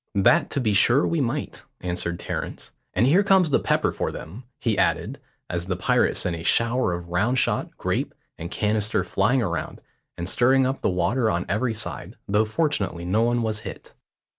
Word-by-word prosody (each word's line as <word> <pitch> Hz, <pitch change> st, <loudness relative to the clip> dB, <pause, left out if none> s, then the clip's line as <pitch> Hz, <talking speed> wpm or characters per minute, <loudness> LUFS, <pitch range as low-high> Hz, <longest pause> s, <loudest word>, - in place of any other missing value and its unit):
"That 145 Hz, -, +4 dB
to -, -, -2 dB
be 110 Hz, -5 st, +1 dB
sure 120 Hz, +7 st, +5 dB
we 165 Hz, -3 st, 0 dB
might," 135 Hz, +3 st, -3 dB, 0.2 s
answered 90 Hz, -1 st, -3 dB
Terence. -, -, -6 dB, 0.2 s
"And 120 Hz, -, +3 dB
here 165 Hz, +9 st, +5 dB
comes 190 Hz, -5 st, +3 dB
the -, -, +4 dB
pepper -, -, +1 dB
for -, -, -3 dB
them," 100 Hz, +11 st, -9 dB
he 115 Hz, -3 st, 0 dB
added, -, -, 0 dB, 0.3 s
as 85 Hz, +1 st, -3 dB
the 95 Hz, -, -1 dB
pirate 90 Hz, -, +1 dB
sent 90 Hz, -2 st, -1 dB
a 80 Hz, -, -7 dB
shower 115 Hz, 0 st, +2 dB
of 85 Hz, 0 st, -6 dB
round 105 Hz, +9 st, +1 dB
shot, -, -, 0 dB
grape, -, -, -2 dB, 0.2 s
and 85 Hz, +1 st, -7 dB
canister 105 Hz, +2 st, 0 dB
flying 130 Hz, -1 st, +1 dB
around, 85 Hz, -4 st, -3 dB, 0.4 s
and 85 Hz, -, -4 dB
stirring 130 Hz, +6 st, +3 dB
up 135 Hz, +1 st, -2 dB
the -, -, +1 dB
water 95 Hz, +7 st, +1 dB
on 90 Hz, -3 st, -1 dB
every 110 Hz, +4 st, -1 dB
side, 85 Hz, -9 st, -5 dB
though 105 Hz, +2 st, +2 dB
fortunately 110 Hz, -, -1 dB
no 100 Hz, +5 st, +1 dB
one 120 Hz, 0 st, +1 dB
was 110 Hz, -1 st, -1 dB
hit. -, -, -9 dB
110 Hz, 190 wpm, -24 LUFS, 90-130 Hz, 0.4 s, sure